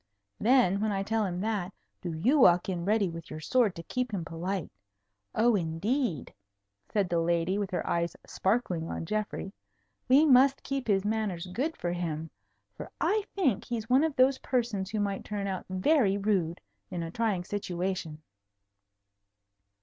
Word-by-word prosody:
Then, 220 -5 +4
when 215 0 +1
I 195 -1 -1
tell 220 +2 0
him 180 0 -3
that, 205 -4 -1 0.3
do 175 - -4
you 230 - +2
walk 175 -7 +6
in 175 -2 -2
ready 210 0 +2
with 165 -1 -8
your 155 - -6
sword 225 +4 +2
to 170 - -7
keep 250 +5 -2
him 185 -5 -3
polite. 175 +2 -4 0.6
Oh, 235 +2 +4
indeed," 180 - -1 0.6
said 205 -3 +1
the 170 -1 +1
lady, 170 +3 +1
with 200 -2 -2
her 180 - -2
eyes 170 -1 0
sparkling 190 -6 -1
on - - -4
Geoffrey, 210 0 -3 0.5
"we 275 +5 +6
must 270 -1 +5
keep 275 -2 -3
his 195 -2 +2
manners 210 -5 -1
good 255 - -3
for 175 - -2
him. 160 -3 -3 0.4
For - - -8
I 425 -1 +1
think 275 - +1
he's 230 -1 -4
one 265 +4 +5
of 320 -3 0
those 260 +1 +4
persons 230 -7 -1
who 215 0 -2
might 200 -1 -1
turn 205 -1 -4
out 190 -2 -4
very 200 +2 +3
rude 195 -5 0 0.3
in 175 -2 -3
a 165 - -5
trying 210 -4 0
situation." 180 -5 -3
200 Hz, 165 wpm, -29 LUFS, 175-235 Hz, 0.6 s, walk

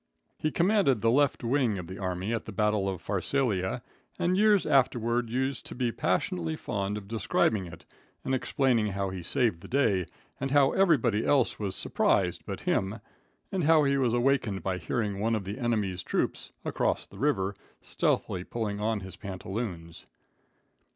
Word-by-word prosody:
He 155 - +1
commanded 170 - +2
the 115 - +3
left 140 0 +2
wing 120 -4 +1
of 90 - -5
the 95 +3 -8
army 95 +3 -2
at 115 - -2
the - - -7
battle 105 -1 +1
of 95 -3 -5
Pharsalia, 100 -2 0 0.3
and 180 +1 +1
years 210 -1 +4
afterward 120 -4 +2
used 130 +2 -1
to - - -7
be 120 -1 0
passionately 85 -4 -1
fond 100 +3 -3
of 100 -2 -8
describing 105 -2 +1
it - - -12 0.4
and 135 - 0
explaining 125 -5 +1
how 100 -1 -2
he 95 -1 -5
saved 100 0 +1
the - - -10
day, 105 - +1 0.3
and 135 - -2
how 140 -1 +4
everybody 130 - +3
else 135 -4 +2
was 100 -3 -3
surprised - - +1
but - - -5
him, 100 +4 0 0.5
and 185 -5 0
how 160 -1 +6
he 140 -1 +2
was 125 -4 +2
awakened 120 -5 +1
by 95 -1 -1
hearing 100 +2 -2
one 115 +2 +1
of 105 - -2
the 100 +6 -5
enemy's 105 -7 0
troops, - - -2
across - - 0
the - - -14
river, 105 -9 +1 0.3
stealthily 90 - 0
pulling 105 -1 -3
on 110 -1 0
his 95 -1 -8
pantaloons. 95 -3 -6
110 Hz, 170 wpm, -28 LUFS, 95-135 Hz, 0.5 s, how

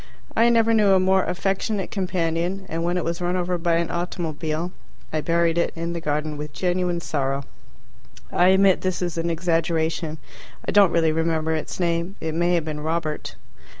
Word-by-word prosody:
I 230 +1 +5
never 230 -1 +4
knew 210 -3 +5
a 190 - +5
more 190 0 +3
affectionate 195 +2 -1
companion, 180 0 -1
and 165 -1 -3
when 175 +1 0
it 175 - -1
was 170 +1 -2
run 175 +1 0
over 180 0 -1
by 170 0 +2
an 170 0 0
automobile, 170 -1 -3 0.4
I 155 - 0
buried 170 +2 +2
it - - +1
in 170 +1 -3
the 170 - -4
garden 150 0 -2
with 150 0 -6
genuine 180 0 0
sorrow. 140 -3 -1 0.9
(I 180 - +4
admit 190 0 +5
this 185 -1 -1
is 170 -2 -2
an 165 +1 -1
exaggeration. 165 -1 0 0.5
I - - +1
don't 205 -3 +6
really 165 -2 +3
remember 160 0 0
its 155 +3 -4
name; 170 +2 0
it 160 -1 -3
may 175 +2 +2
have 165 -2 0
been 155 -1 -4
Robert.) 155 0 -3
170 Hz, 185 wpm, -23 LUFS, 160-180 Hz, 0.9 s, don't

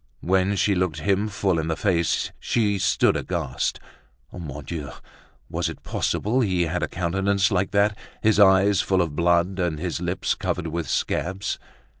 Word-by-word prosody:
When 95 +2 +2
she 100 +1 +2
looked 90 -4 -1
him 100 +4 +1
full 95 -4 0
in 80 - -2
the 80 - 0
face, 85 -4 0
she 105 -4 0
stood - - +3
aghast. 80 -8 -2 0.5
Mon 75 -4 -7
Dieu! 80 -4 -5 0.6
was - - -2
it - - -9
possible 120 +6 0
he 95 -6 +1
had 85 +2 -2
a - - 0
countenance 95 +2 0
like 95 0 +1
that, 100 +1 +2 0.3
his 110 -1 +3
eyes 100 0 +5
full 95 -2 +2
of 80 -4 -5
blood 85 +3 +2
and 85 -4 0
his 85 +1 -3
lips 90 +1 -1
covered 90 - -3
with 85 +1 -3
scabs? 95 +5 -1
90 Hz, 165 wpm, -24 LUFS, 85-100 Hz, 0.6 s, eyes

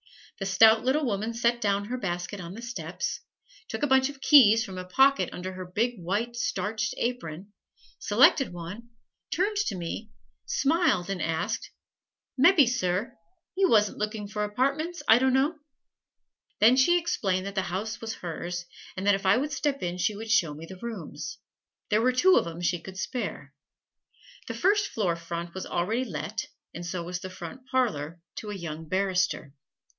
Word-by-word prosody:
The 195 - -2
stout 220 +3 +6
little 275 +4 +2
woman 215 -1 -1
set 235 +1 +1
down 200 -1 +1
her 250 +4 -3
basket 180 0 -3
on 175 +2 -8
the 230 - -9
steps, 235 0 -4 0.5
took - - -5
a - - +3
bunch 265 0 +4
of 280 -1 -10
keys 230 -6 +7
from 185 -1 -7
a - - -4
pocket 270 +9 +3
under 185 +1 -6
her 185 0 -7
big, 220 +4 -1
white, 210 +7 -2
starched 220 -1 -2
apron, 200 -6 -4 0.5
selected 270 - +4
one, 180 +7 -8 0.4
turned 405 +4 0
to 405 - 0
me, 185 +5 -5 0.4
smiled, 285 - +2
and 185 -3 -3
asked, 160 0 -2 0.7
"Mebbe, 310 +1 +7
Sir, 230 0 -1 0.4
you 380 -1 +3
wasn't 210 -2 +3
looking 210 0 -3
for 210 0 -3
apartments, 275 +11 -1
I 225 +2 +7
dunno?" 265 +5 +2 1.0
Then 225 +4 +7
she 310 +7 +5
explained 195 - -1
that 200 - -5
the 195 - +1
house 200 +5 -4
was 225 -1 -4
hers, 175 +1 -5 0.3
and 190 - -3
that 205 - +5
if 195 0 -1
I 190 - +6
would 290 +4 -1
step 280 -2 -1
in 175 0 -3
she 210 +3 +1
would 220 +1 -5
show 170 -10 +3
me 160 +2 -9
the 185 +2 -11
rooms. 235 -2 -6 0.5
There 210 +1 +4
were 255 +2 +3
two 365 +9 +5
of - - +2
'em 170 +1 -7
she 175 -1 0
could 190 +2 -10
spare. 195 - -4 0.9
The - - -4
first 405 +1 +2
floor 185 -6 -1
front 170 0 -6
was 190 - -5
already 220 +9 -1
let, 155 - -4 0.3
and 175 - -7
so 175 0 -4
was 180 +1 -4
the 185 0 -7
front 185 +8 -9
parlor 170 - 0 0.2
to 215 - -6
a 210 - -4
young 160 -3 -6
barrister. 185 -5 0
210 Hz, 175 wpm, -27 LUFS, 180-255 Hz, 1.0 s, keys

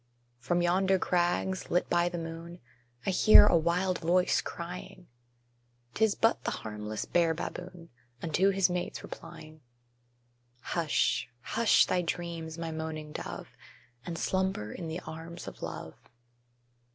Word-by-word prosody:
From 175 +9 0
yonder 190 +2 +3
crags, 180 +1 0
lit 175 - +1
by 175 0 +2
the 175 - -5
moon, 165 +1 -7 0.5
I 195 - +2
hear 210 +3 +8
a 205 - +4
wild 175 +3 +1
voice 180 +2 +3
crying: 175 +1 -7 0.9
'Tis 220 -1 +2
but 225 +1 +2
the - - 0 0.2
harmless 105 0 -4
bear 170 -2 +2
baboon, 175 0 -7 0.3
Unto 170 +6 +2
his 195 -1 +3
mates 180 -1 -3
replying. 155 0 -10 1.0
Hush 160 +3 0
hush 230 - +4
thy 180 - +1
dreams, 170 -1 -4
my 165 -1 -4
moaning 160 -1 -5
dove, - - -6 0.5
And 170 -1 -5
slumber 190 - -1
in 170 - -6
the 160 +3 -4
arms 165 +2 -8
of - - -9
love! - - -6
175 Hz, 130 wpm, -30 LUFS, 160-180 Hz, 1.0 s, hear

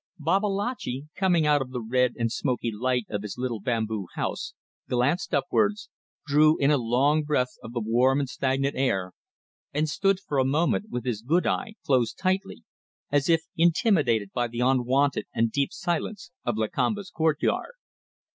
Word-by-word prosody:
Babalatchi, 195 - -1
coming 180 -4 +2
out 150 -1 +4
of 130 - -4
the 125 -1 -4
red 125 +2 +1
and 115 -1 0
smoky 125 -2 -1
light 125 +2 -1
of 105 -2 -2
his 105 +1 -6
little 125 -3 -2
bamboo 110 -3 -2
house, - - -3 0.3
glanced 130 +9 +1
upwards, 205 +3 0 0.3
drew 155 +2 +4
in 140 +1 +3
a 150 - +4
long 130 +6 +2
breath 135 -4 0
of 115 - -9
the 120 - -1
warm 125 +5 +3
and 140 - -1
stagnant 135 +2 -1
air, 95 -9 0 0.6
and 150 +2 0
stood 195 +5 +1
for 145 -7 -2
a - - +4
moment 160 +10 +1
with 125 -2 -4
his 115 -4 -2
good 160 +10 +1
eye 220 -3 -1
closed 125 -5 +1
tightly, 195 +4 -1 0.5
as 145 +1 +2
if 165 -1 +4
intimidated 155 - +2
by 120 -1 0
the 120 0 -7
unwonted 130 +2 +2
and 115 0 +2
deep 140 +2 0
silence 175 +3 -3
of 120 -3 -1
Lakamba's 195 - -1
courtyard. 160 - 0
135 Hz, 165 wpm, -26 LUFS, 120-165 Hz, 0.6 s, out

